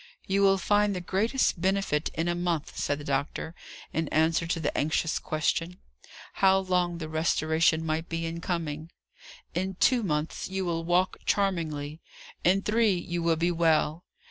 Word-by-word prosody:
"You 195 +1 +1
will 195 -1 +5
find 205 +2 +2
the - - -2
greatest 195 +2 0
benefit 190 -5 +1
in 165 +1 -1
a 175 - +1
month," 175 -3 -2
said 145 - -1
the 145 - -8
doctor, 140 +3 -2 0.4
in 160 -1 -1
answer 160 +2 +2
to 165 0 -1
the 150 - -2
anxious 155 +2 0
question, 165 +3 -1 0.6
How 190 0 +4
long 180 -2 0
the 160 -2 -5
restoration 160 0 +1
might 160 +1 -2
be 165 0 -2
in 165 +1 -4
coming. 160 -3 -3 0.6
"In 190 +1 -2
two 245 +6 +3
months 155 -5 -2
you 190 0 -2
will 165 -1 -1
walk 175 +2 +1
charmingly; 160 -6 -1 0.4
in 190 +3 +3
three, 215 -3 +2
you 175 0 -3
will 165 0 +2
be 170 +2 +1
well." 165 -1 +2
170 Hz, 165 wpm, -28 LUFS, 160-190 Hz, 0.6 s, will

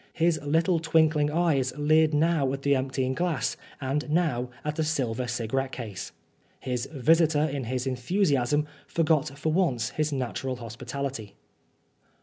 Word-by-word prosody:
His 165 -1 +2
little 165 +4 +2
twinkling 160 -2 +3
eyes 150 -6 +1
leered 155 +1 +4
now 150 -3 +2
at 140 0 -5
the 140 0 +3
emptying 130 0 -1
glass 165 -7 -1 0.2
and 145 +3 -2
now 150 -7 +1 0.2
at 150 0 -1
the 160 - 0
silver 130 -6 -1
cigarette 125 +3 -2
case. 105 -6 -6 0.5
His 125 0 -3
visitor, 155 +2 +3
in 140 -4 -2
his 125 +2 -2
enthusiasm, 140 +1 +1 0.2
forgot 155 -3 +1
for 155 +2 -1
once 130 -10 +1
his 155 0 -1
natural 130 -1 -2
hospitality. 120 -1 -6
140 Hz, 135 wpm, -27 LUFS, 130-160 Hz, 0.5 s, leered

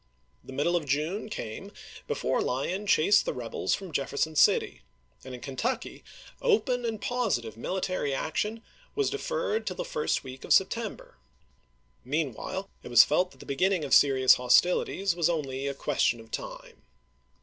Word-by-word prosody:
The - - -11
middle 145 +6 0
of 160 -4 -1
June 155 +10 -1
came 110 - -6 0.4
before - - 0
Lyon 180 +11 -2
chased 200 +4 +5
the - - -3
rebels 120 -2 -1
from 190 -3 -9
Jefferson 145 +2 -1
City, 100 - +3 0.4
and 130 -1 -7
in 125 - -11
Kentucky 225 - -3 0.4
open 285 - +1
and 225 -2 -2
positive 200 - -1
mihtary 185 +4 -2
action 210 +11 -2 0.3
was 420 -2 +1
deferred 475 +1 -2
till - - -2
the - - -4
first 480 - -1
week 130 -1 -10
of - - +2
September. - - -1 0.9
Meanwhile 150 - -3
it - - -10
was 120 0 +8
felt 180 +5 +1
that - - -17
the - - -11
beginning 180 +3 +1
of 135 - -2
serious 130 -2 +6
hostilities 175 +8 +2
was 170 -1 +2
only 140 -4 -2
a 140 - -3
question 135 -4 +1
of 115 0 -14
time. - - -7
160 Hz, 155 wpm, -28 LUFS, 135-205 Hz, 0.9 s, was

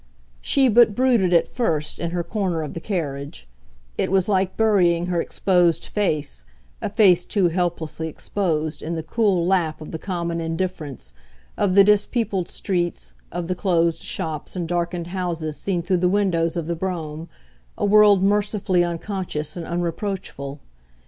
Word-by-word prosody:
She 270 -2 +3
but 230 -2 +5
brooded, 245 -8 +3
at 170 -2 +4
first, 160 -11 -1
in 170 - -2
her 175 0 -2
corner 175 -3 -2
of 150 - -6
the - - -5
carriage: 140 - -4 0.5
it - - 0
was 190 -1 +2
like 190 -2 0
burying 180 -6 +3
her 175 -1 0
exposed 175 -4 +2
face, 150 - -2 0.3
a - - -2
face 190 -4 +5
too 190 -3 +1
helplessly 165 -2 -2
exposed, 160 -2 -2
in 165 +2 -3
the 160 - -4
cool 190 0 +1
lap 175 -4 +1
of 155 - -9
the 160 - -5
common 170 -3 -3
indifference, 165 - -4 0.4
of 190 -2 +1
the 200 - +9
dispeopled 205 -2 +1
streets, 175 -3 -2 0.2
of 175 -1 -4
the 185 - 0
closed 170 -3 +1
shops 155 +1 -4
and 175 -2 -3
darkened 175 0 -2
houses 170 -4 -3
seen 180 -1 -2
through 185 +1 +1
the 180 +1 +2
window 190 -4 +2
of 170 -1 -3
the 170 +1 -2
brougham, 165 -3 -4 0.5
a - - 0
world 205 -2 +6
mercifully 200 -3 +2
unconscious 175 -3 -3
and 170 -2 -6
unreproachful. 170 -5 -4
175 Hz, 155 wpm, -22 LUFS, 165-195 Hz, 0.5 s, the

